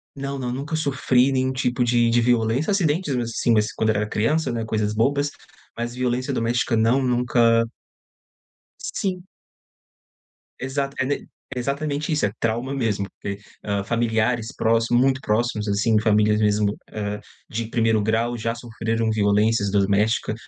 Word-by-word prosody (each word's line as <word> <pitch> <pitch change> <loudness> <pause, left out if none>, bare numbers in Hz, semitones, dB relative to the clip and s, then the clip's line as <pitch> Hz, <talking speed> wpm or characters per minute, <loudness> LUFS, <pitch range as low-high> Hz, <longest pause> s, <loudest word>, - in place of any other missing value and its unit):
Não, 140 0 -4
não. 125 -2 -3
Nunca 140 +6 -3
sofri 135 -3 +2
nenhum 130 0 +1
tipo 125 -1 0
de 120 -1 +3
de 120 +1 +3
violência. 120 - +1
Acidentes, 170 -3 +1
mesmo 120 - 0
assim, 115 +1 -1
mas 110 -1 +2
quando 110 - 0
eu 110 - +2
era 105 +1 0
criança, 150 +9 +1
né? 115 -1 -2
Coisas 105 -1 -1
bobas. 140 +6 +1 0.5
Mas 120 +1 -3
violência 125 +2 -1
doméstica 120 0 0
não, 115 +4 +3
nunca 120 -2 +3 1.1
Sim. 185 -2 -3 1.3
Exata 140 +1 -3
é 135 - +2
ne 140 +2 -2 0.3
exatamente 145 +4 -2
isso. 150 - +2
É 100 - -1
trauma 120 +4 -1
mesmo. 110 -7 -1
Que, 100 -1 -4 0.3
hã, 100 -1 -1
familiares 115 +2 0
próximos 115 +2 +2
muito 130 0 +2
próximos 110 -1 0
assim. 105 +2 +2
Famílias 105 -1 +3
mesmo, 105 0 +2 0.2
eh, 105 -1 -3 0.3
de 115 0 -3
primeiro 115 -2 +2
grau 115 +3 0
já 115 +1 -2
sofreram 115 -1 -2
violências 105 0 +2
doméstica, 105 +2 +1
115 Hz, 150 wpm, -23 LUFS, 110-130 Hz, 1.3 s, de